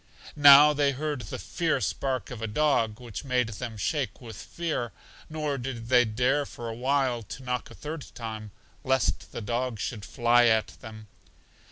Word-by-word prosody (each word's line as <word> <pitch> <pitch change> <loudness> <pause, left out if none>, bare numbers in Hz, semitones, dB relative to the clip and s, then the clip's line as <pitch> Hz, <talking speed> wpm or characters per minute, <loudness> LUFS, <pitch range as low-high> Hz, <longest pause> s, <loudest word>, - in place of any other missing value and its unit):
Now 145 0 +9
they 145 -1 +2
heard 145 0 -3
the 105 - -6
fierce 160 - -1
bark 130 -2 -3
of 120 -3 -7
a 115 - -2
dog, 115 -3 +1
which 120 -2 -7
made 125 -4 0
them 110 +1 -6
shake 130 +2 -2
with 115 -4 -10
fear, 155 - -4 0.4
nor 150 -3 -2
did 120 -2 -6
they 125 -1 +5
dare 125 +6 +1
for 120 - -8
a - - -4
while 130 -1 0
to 115 +5 -9
knock 125 0 -3
a - - -12
third 150 -1 -7
time, 110 -2 -6 0.3
lest 130 0 0
the - - -6
dog 120 +2 -2
should 105 0 -4
fly 120 +1 +3
at 110 -1 +2
them. 110 -1 -10
125 Hz, 175 wpm, -27 LUFS, 115-140 Hz, 0.4 s, Now